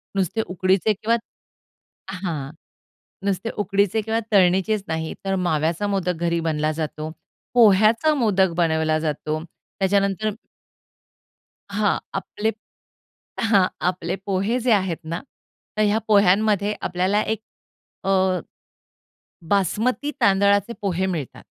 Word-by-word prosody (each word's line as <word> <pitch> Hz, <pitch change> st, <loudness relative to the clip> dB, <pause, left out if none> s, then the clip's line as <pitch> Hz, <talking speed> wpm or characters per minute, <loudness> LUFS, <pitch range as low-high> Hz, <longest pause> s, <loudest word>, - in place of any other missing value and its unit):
नुसते 195 Hz, +3 st, 0 dB
उकडीचे 190 Hz, +3 st, +2 dB
किंवा 220 Hz, +3 st, 0 dB, 1.1 s
हां 150 Hz, -7 st, -3 dB, 0.7 s
नुसते 200 Hz, +3 st, -1 dB
उकडीचे 200 Hz, +2 st, +1 dB
किंवा 220 Hz, +1 st, -1 dB
तळणीचेच 190 Hz, +2 st, +3 dB
नाही 160 Hz, 0 st, -2 dB
तर 195 Hz, 0 st, 0 dB
माव्याचा 160 Hz, +5 st, 0 dB
मोदक 190 Hz, -3 st, 0 dB
घरी 170 Hz, 0 st, +1 dB
बनला 155 Hz, 0 st, 0 dB
जातो. 155 Hz, 0 st, -4 dB, 0.4 s
पोह्चाया 225 Hz, +6 st, +5 dB
मोदक 195 Hz, -8 st, +2 dB
बनवला 160 Hz, -2 st, +2 dB
जातो 155 Hz, 0 st, -2 dB
त्याच्यानंतर 195 Hz, +4 st, -1 dB, 1.4 s
हां 205 Hz, 0 st, +1 dB, 0.2 s
आपले 215 Hz, +3 st, -2 dB, 1.0 s
हां 195 Hz, -4 st, +5 dB, 0.2 s
आपले 180 Hz, 0 st, -4 dB
पोहे 200 Hz, +5 st, 0 dB
जे 245 Hz, +1 st, +1 dB
आहेत 190 Hz, -5 st, 0 dB
ना, 165 Hz, +2 st, -4 dB, 0.6 s
तर 215 Hz, -, +3 dB
ह्या 210 Hz, +1 st, +2 dB
पोह्यांमध्ये 205 Hz, 0 st, +3 dB, 0.2 s
आपल्याला 185 Hz, +4 st, +1 dB
एक 220 Hz, 0 st, -2 dB, 0.6 s
अ, 190 Hz, -, -2 dB, 1.4 s
बासमती 225 Hz, -, +1 dB
तांदळाचे 200 Hz, +2 st, +3 dB
पोहे 190 Hz, -2 st, 0 dB
मिळतात. 165 Hz, -8 st, -4 dB
195 Hz, 105 wpm, -23 LUFS, 175-210 Hz, 1.4 s, पोह्चाया